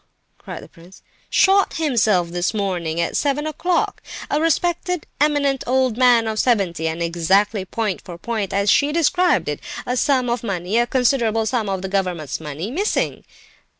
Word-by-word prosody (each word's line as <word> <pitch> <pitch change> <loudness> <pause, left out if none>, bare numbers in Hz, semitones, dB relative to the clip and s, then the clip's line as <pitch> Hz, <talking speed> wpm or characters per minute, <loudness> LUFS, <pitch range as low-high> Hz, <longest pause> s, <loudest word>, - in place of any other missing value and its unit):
cried - - -8
the - - -12
prince. 175 +3 -18 0.3
"Shot 390 0 +3
himself 220 - +2
this 175 +4 -2
morning, 175 -5 -2
at 170 - -1
seven 290 +1 0
o'clock. 340 +3 -1 0.3
A 295 - +1
respected, 345 +2 0
eminent 285 -2 +1
old 255 -2 +2
man 245 -2 +4
of 215 -1 -2
seventy; 190 -10 +1
and 165 +1 -2
exactly 190 +4 +1
point 210 -1 -3
for 175 -2 -9
point 215 0 -3
as 200 +1 +2
she 285 +1 +3
described 350 +3 +2
it; - - -3 0.3
a 250 - -1
sum 255 -1 +2
of 240 +1 -1
money, 195 +1 -1
a 240 - +2
considerable 235 -3 +1
sum 220 -2 -1
of 190 0 -3
government 180 -6 -2
money, 155 +7 -5
missing!" 395 +10 -1
225 Hz, 160 wpm, -21 LUFS, 185-280 Hz, 0.3 s, man